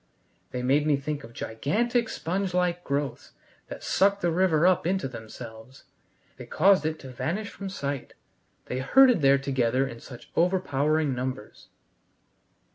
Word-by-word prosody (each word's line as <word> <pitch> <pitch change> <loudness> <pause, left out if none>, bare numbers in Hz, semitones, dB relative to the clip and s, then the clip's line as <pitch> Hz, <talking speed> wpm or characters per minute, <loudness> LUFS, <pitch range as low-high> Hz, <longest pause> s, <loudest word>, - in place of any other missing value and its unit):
They 125 0 -4
made 145 +4 +2
me 145 -2 +3
think 145 +1 -4
of 115 - -11
gigantic 220 - -1
sponge 185 +2 -2
like 180 -1 0
growths 140 -1 -3 0.3
that - - -9
sucked 200 +1 +2
the 175 - +1
river 170 -2 +3
up 185 -2 +3
into 190 -5 0
themselves. 115 +1 -10 0.5
They - - -10
caused 190 -6 +4
it 160 0 -3
to 135 - -9
vanish 190 - -3
from 200 -1 -7
sight. 140 -7 -5 0.5
They 125 - -3
herded 245 - +5
there 140 0 +5
together 130 -1 0
in 115 -3 -9
such 125 -1 -12
overpowering 155 -4 +1
numbers. 125 -3 -6
150 Hz, 145 wpm, -26 LUFS, 130-185 Hz, 0.5 s, herded